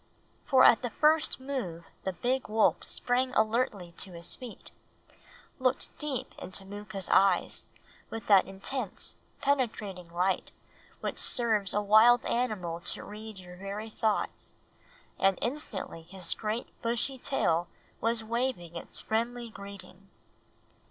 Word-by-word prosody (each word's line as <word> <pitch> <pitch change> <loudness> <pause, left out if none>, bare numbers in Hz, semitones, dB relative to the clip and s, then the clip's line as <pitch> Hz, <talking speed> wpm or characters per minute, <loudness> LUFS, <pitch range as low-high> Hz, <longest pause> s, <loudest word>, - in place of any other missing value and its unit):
For 260 -2 +6
at 225 - +8
the 245 - -2
first 310 +5 +3
move 250 -12 -4 0.2
the 190 - 0
big 255 +7 0
wolf 215 0 +3
sprang 250 +1 0
alertly 215 -5 +1
to 190 - -3
his 170 0 -4
feet, 250 -4 -10 0.9
looked 255 0 0
deep 295 -5 -3
into 190 +1 -4
Mooka's 205 -1 -4
eyes 195 -2 +4 0.4
with 225 -1 -6
that 200 -3 +6
intense, 195 +3 -3 0.3
penetrating 215 -10 0
light 180 +2 0 0.5
which - - -3
serves 220 -5 +2
a 210 - +2
wild 220 +4 +7
animal 205 -9 -1
to - - -6
read 215 0 -8
your 180 -1 -11
very 200 +3 -5
thoughts, 215 -1 -1 0.7
and 195 -1 +4
instantly 235 - -3
his 175 +1 0
great 220 +2 -3
bushy 240 +3 0
tail 170 -11 +1 0.3
was 230 0 +1
waving 230 -7 -2
its 170 - -5
friendly 235 +1 -2
greeting. 195 -1 -11
215 Hz, 125 wpm, -30 LUFS, 190-245 Hz, 0.9 s, at